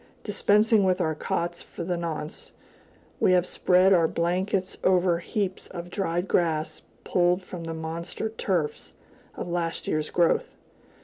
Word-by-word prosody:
Dispensing 210 +1 +3
with 185 -1 +2
our 160 -3 +1
cots 170 +2 -2
for - - -8
the 175 +1 -1
nonce, 165 -3 -5 0.7
we 185 - +4
have 180 -1 +4
spread 185 +1 +4
our 170 -3 +4
blankets 185 +3 -1
over 180 -2 +3
heaps 190 +1 -3
of 175 -1 -8
dried 180 -2 -1
grass 160 -4 0 0.2
pulled 180 +1 +2
from 175 -2 -7
the 165 0 -4
monster 165 +6 -4
tufts 185 -8 -2 0.4
of - - -5
last 170 -1 -2
year's 155 -1 -1
growth. 170 -1 +1
175 Hz, 140 wpm, -26 LUFS, 165-185 Hz, 0.7 s, we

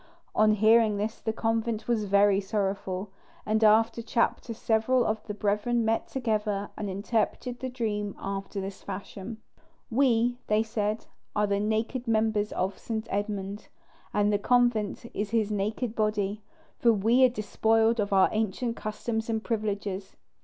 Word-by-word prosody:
On 215 0 +4
hearing 220 0 +4
this 215 +2 -3
the 220 - -1
convent 225 0 -1
was 225 -3 +1
very 200 0 +4
sorrowful; 195 -1 -2 0.3
and 220 +1 +1
after 225 +2 +4
chapter 235 +1 0
several 230 +2 +2
of 215 0 -1
the 210 - -3
brethren 210 +3 0
met 225 +1 0
together, 210 -5 -1
and 210 -2 -4
interpreted 220 +5 -1
the 260 - -3
dream 210 -5 -2
after 195 +1 -4
this 195 0 -6
fashion: 200 +2 -7 0.5
"We," 245 -1 +2 0.2
said 215 -1 -1
they, - - -24 0.3
"are 210 0 +3
the 200 0 0
naked 220 +4 -1
members 215 -2 +1
of 190 +1 -2
St. 220 -1 -4
Edmund, 205 0 -3 0.4
and 205 0 +2
the 205 - +2
convent 240 -2 +2
is 205 0 -2
his 215 -1 +1
naked 215 +3 -1
body; 210 -2 0 0.4
for 240 -5 +5
we 225 +5 +3
are 255 - +7
despoiled 225 +1 +2
of 205 -1 0
our 190 -1 +5
ancient 220 +2 -1
customs 220 +1 -3
and 220 -1 -1
privileges. 205 -3 -3
215 Hz, 150 wpm, -28 LUFS, 205-230 Hz, 0.5 s, are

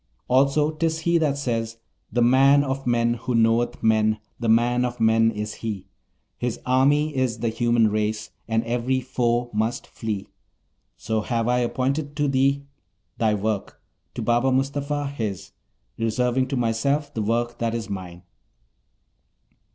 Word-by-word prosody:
Also 140 +4 +3
'tis 160 +1 -1
he 170 +1 +2
that 145 -3 +1
says: 115 -4 -2 0.3
"The 120 - +2
man 135 +3 +5
of 135 -1 -3
men 120 -1 +2
who 120 +1 -3
knoweth 115 +1 +2
men, 110 -1 +3 0.2
the 115 -2 -1
Man 120 +2 +3
of 120 -1 -3
men 115 0 +4
is 105 -1 -4
he! 105 -5 -5 0.5
His 120 -2 -2
army 145 +4 +2
is 130 -3 0
the 115 +1 -1
human 120 0 +2
race, 105 0 -2 0.2
and 110 0 +1
every 120 +2 0
foe 120 -1 -1
must 110 +3 -1
flee." 105 -4 -4 0.7
So 110 -1 -1
have 115 +1 -1
I 125 0 +2
apportioned 135 +4 -1
to 145 0 +1
thee 140 +1 +2 0.6
thy 110 -2 +2
work, 105 0 -3 0.4
to - - -3
Baba 120 +3 +2
Mustapha 140 +2 -1
his; 105 -9 -4 0.5
reserving 125 +3 +1
to 135 - -2
myself 140 +6 0
the 110 - -2
work 120 +3 -1
that 115 -1 -1
is 115 -3 -4
mine!' 90 -3 -7
120 Hz, 150 wpm, -24 LUFS, 110-135 Hz, 0.7 s, man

